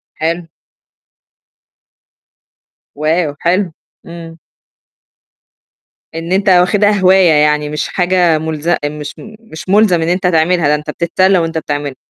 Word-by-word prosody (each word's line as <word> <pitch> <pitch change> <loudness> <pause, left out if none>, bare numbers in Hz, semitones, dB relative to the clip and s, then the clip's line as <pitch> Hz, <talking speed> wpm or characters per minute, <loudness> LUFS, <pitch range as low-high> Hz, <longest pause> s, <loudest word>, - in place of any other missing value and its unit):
حلو. 165 +1 -3 2.5
واو! 155 +1 -1
حلو. 180 +1 0 0.3
إمم. 165 -1 -10 1.8
إن 165 +2 -6
أنت 195 +1 +1
واخِدها 185 +3 +3
هواية 185 -2 +4
يعني، 150 0 +2
مش 150 0 -3
حاجة 180 -3 +1
مُلز 160 0 -5 0.2
مش 150 -1 -8
م 215 0 -12
مش 190 -6 -11
مُلزم 200 -4 +3
إن 160 - -2
أنت 180 +1 0
تعملها 165 -1 +1
ده 150 - +2
أنت 150 +1 -7
بتتسلّى 185 +4 +1
وأنت 165 -1 -2
بتعملها. 145 -3 -4
170 Hz, 120 wpm, -14 LUFS, 155-185 Hz, 2.5 s, هواية